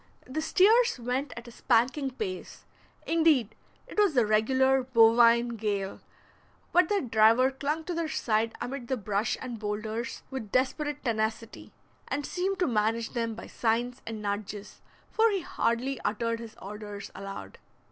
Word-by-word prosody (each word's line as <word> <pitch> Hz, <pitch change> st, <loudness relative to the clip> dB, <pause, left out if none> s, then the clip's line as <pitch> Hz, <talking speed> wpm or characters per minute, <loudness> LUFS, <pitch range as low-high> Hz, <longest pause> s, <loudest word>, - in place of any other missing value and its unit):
The 270 Hz, +5 st, -3 dB
steers 445 Hz, -, +4 dB
went 250 Hz, +4 st, -2 dB
at 235 Hz, +1 st, -8 dB
a -, -, -10 dB
spanking 255 Hz, +4 st, +1 dB
pace; 200 Hz, -8 st, -6 dB, 0.4 s
indeed, 315 Hz, -9 st, +3 dB, 0.3 s
it -, -, -5 dB
was 390 Hz, -10 st, +3 dB
a 240 Hz, -, +5 dB
regular 260 Hz, +5 st, +3 dB
bovine 235 Hz, -1 st, +5 dB
gale; 205 Hz, -4 st, -3 dB, 0.7 s
but 355 Hz, -2 st, +4 dB
their 410 Hz, -1 st, +2 dB
driver 230 Hz, +2 st, +4 dB
clung 295 Hz, +4 st, -2 dB
to 355 Hz, -, -4 dB
their 335 Hz, -1 st, -1 dB
side 225 Hz, -6 st, 0 dB
amid 250 Hz, -1 st, -5 dB
the 260 Hz, -, -1 dB
brush 210 Hz, +1 st, -1 dB
and 245 Hz, -3 st, -6 dB
boulders 215 Hz, +2 st, -4 dB
with 240 Hz, -6 st, -6 dB
desperate 290 Hz, +3 st, 0 dB
tenacity, 220 Hz, 0 st, -2 dB, 0.4 s
and 285 Hz, 0 st, -2 dB
seemed 380 Hz, +2 st, -1 dB
to 360 Hz, -, +1 dB
manage 225 Hz, 0 st, 0 dB
them 230 Hz, -2 st, -2 dB
by -, -, -8 dB
signs 240 Hz, +2 st, -1 dB
and 220 Hz, -2 st, -5 dB
nudges, 205 Hz, 0 st, -5 dB, 0.3 s
for 450 Hz, +1 st, +4 dB
he 395 Hz, -3 st, -1 dB
hardly 255 Hz, -1 st, -1 dB
uttered 230 Hz, +2 st, -1 dB
his 230 Hz, -1 st, -9 dB
orders 205 Hz, 0 st, -8 dB
aloud. 195 Hz, -, -8 dB
235 Hz, 150 wpm, -28 LUFS, 220-275 Hz, 0.7 s, a